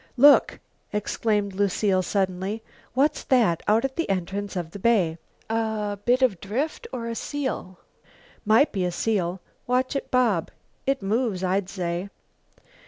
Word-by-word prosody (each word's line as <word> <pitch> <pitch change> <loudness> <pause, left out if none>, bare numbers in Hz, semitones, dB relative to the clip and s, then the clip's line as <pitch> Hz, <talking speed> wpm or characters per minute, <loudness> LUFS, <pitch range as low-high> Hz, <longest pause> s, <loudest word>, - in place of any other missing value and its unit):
"Look!" 285 +3 +6 0.3
exclaimed 210 -1 0
Lucile 195 0 +1
suddenly. 190 +3 -1 0.3
"What's 290 +3 +2
that 225 -11 +3
out 220 +4 +4
at 265 0 -4
the 335 - -1
entrance 195 +2 -2
of 170 -3 -3
the 200 - -8
bay 185 -7 +2 0.3
a 220 -2 -1
bit 250 +2 +3
of 210 -9 +2
drift 275 - -3
or 235 -2 -4
a 230 - -2
seal?" 260 -7 -4 0.7
"Might 225 +7 +4
be 190 -3 -1
a 180 - 0
seal. 185 -2 -1 0.3
Watch 255 +2 +1
it 275 - -3
bob. 230 -10 +2 0.4
It 275 -6 +1
moves, 210 -2 0
I'd 185 +1 0
say." 180 0 -3
210 Hz, 145 wpm, -25 LUFS, 190-245 Hz, 0.7 s, Look